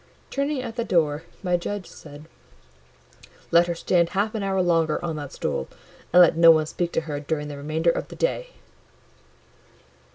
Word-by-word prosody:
Turning 280 0 -1
at 235 -1 -7
the 235 - 0
door, 160 -5 0 0.2
my 180 -1 +1
judge 190 +2 -4
said— 145 0 -13 1.3
"Let 170 +1 +5
her 170 - -2
stand 170 0 +1
half 210 +2 +1
an 220 - -3
hour 195 -1 -1
longer 165 -4 +2
on 165 -2 -3
that 145 -2 -7
stool, - - -3 0.4
and 180 +1 +8
let 170 - +4
no 165 0 +7
one 155 -1 +6
speak 170 +2 -3
to - - +1
her 150 -3 -5
during 150 0 -3
the 145 - -7
remainder 155 +4 0
of - - -4
the - - -11
day." - - -1
170 Hz, 175 wpm, -24 LUFS, 155-190 Hz, 1.3 s, and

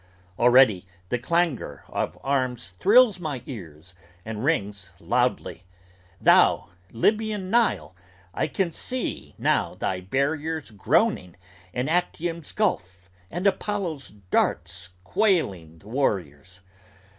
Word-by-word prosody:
Already 120 -6 +5 0.3
the 125 - 0
clangor 140 - -1
of - - -3
arms 130 -9 -1
thrills 220 -1 +5
my 145 -7 -4
ears, 85 - -10 0.3
and 110 0 -5
rings 100 - -1
loudly: 120 -1 -1 0.5
Thou, - - +4 0.2
Lybian 210 - 0
Nile, 235 0 +1 0.4
I - - 0
can 190 -5 -1
see 255 +9 -4
now - - +1
thy 95 - -2
barriers 145 - -2
groaning 110 - +1 0.4
And 125 +7 -2
Actium's 170 -1 -1
gulf 90 - -2 0.2
and 175 - -4
Apollo's 190 -7 -1 0.2
darts 85 +1 0
quailing 95 - 0
the 100 - -18
warriors! 90 - -2
130 Hz, 105 wpm, -25 LUFS, -, 0.5 s, Already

